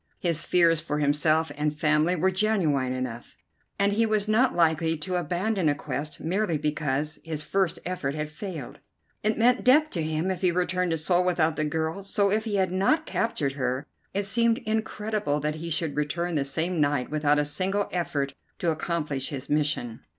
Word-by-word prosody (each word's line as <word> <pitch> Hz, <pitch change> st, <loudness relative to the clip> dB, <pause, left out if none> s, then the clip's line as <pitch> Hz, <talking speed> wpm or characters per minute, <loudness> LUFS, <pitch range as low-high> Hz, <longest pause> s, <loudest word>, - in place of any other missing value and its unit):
His 170 Hz, -3 st, 0 dB
fears 170 Hz, -2 st, +3 dB
for 155 Hz, -2 st, -3 dB
himself 150 Hz, +2 st, +2 dB
and 150 Hz, 0 st, -2 dB
family 155 Hz, +3 st, +3 dB
were 185 Hz, +3 st, +2 dB
genuine 180 Hz, -10 st, +1 dB
enough, 130 Hz, -2 st, -5 dB, 0.4 s
and 200 Hz, 0 st, +2 dB
he 225 Hz, +2 st, +2 dB
was 215 Hz, -1 st, +1 dB
not 245 Hz, +4 st, +3 dB
likely 165 Hz, -1 st, +2 dB
to 180 Hz, +4 st, -3 dB
abandon 180 Hz, +1 st, 0 dB
a 145 Hz, -, +2 dB
quest 145 Hz, +1 st, -4 dB
merely 175 Hz, 0 st, 0 dB
because 150 Hz, 0 st, -1 dB
his 155 Hz, -2 st, -4 dB
first 190 Hz, +1 st, 0 dB
effort 155 Hz, -6 st, -2 dB
had 150 Hz, 0 st, -2 dB
failed. 155 Hz, -, -7 dB, 0.4 s
It 215 Hz, +1 st, 0 dB
meant 245 Hz, +2 st, +3 dB
death 300 Hz, +5 st, +5 dB
to 170 Hz, -, -2 dB
him 160 Hz, +4 st, -1 dB
if 185 Hz, -, -4 dB
he 185 Hz, -, +4 dB
returned 180 Hz, +1 st, 0 dB
to 165 Hz, -, 0 dB
Seoul 175 Hz, +3 st, +2 dB
without 165 Hz, -3 st, +2 dB
the 155 Hz, -, 0 dB
girl, 160 Hz, +5 st, -2 dB
so, 200 Hz, 0 st, +2 dB
if 215 Hz, +2 st, +1 dB
he 215 Hz, -2 st, -1 dB
had 190 Hz, -2 st, +1 dB
not 200 Hz, -, +2 dB
captured 165 Hz, -12 st, -1 dB
her, 130 Hz, +1 st, -2 dB, 0.3 s
it 200 Hz, -, -1 dB
seemed 230 Hz, +3 st, +2 dB
incredible 215 Hz, -7 st, -1 dB
that 150 Hz, +1 st, -1 dB
he 170 Hz, -, -4 dB
should 160 Hz, -2 st, -1 dB
return 170 Hz, +4 st, -1 dB
the 145 Hz, -3 st, 0 dB
same 160 Hz, +4 st, -1 dB
night 145 Hz, -2 st, +1 dB
without 150 Hz, -1 st, +2 dB
a 150 Hz, -, +2 dB
single 190 Hz, +7 st, -1 dB
effort 145 Hz, -6 st, -1 dB, 0.2 s
to 170 Hz, -, +1 dB
accomplish 155 Hz, -4 st, -2 dB
his 140 Hz, -1 st, -6 dB
mission. 145 Hz, -6 st, 0 dB
165 Hz, 185 wpm, -26 LUFS, 150-195 Hz, 0.4 s, death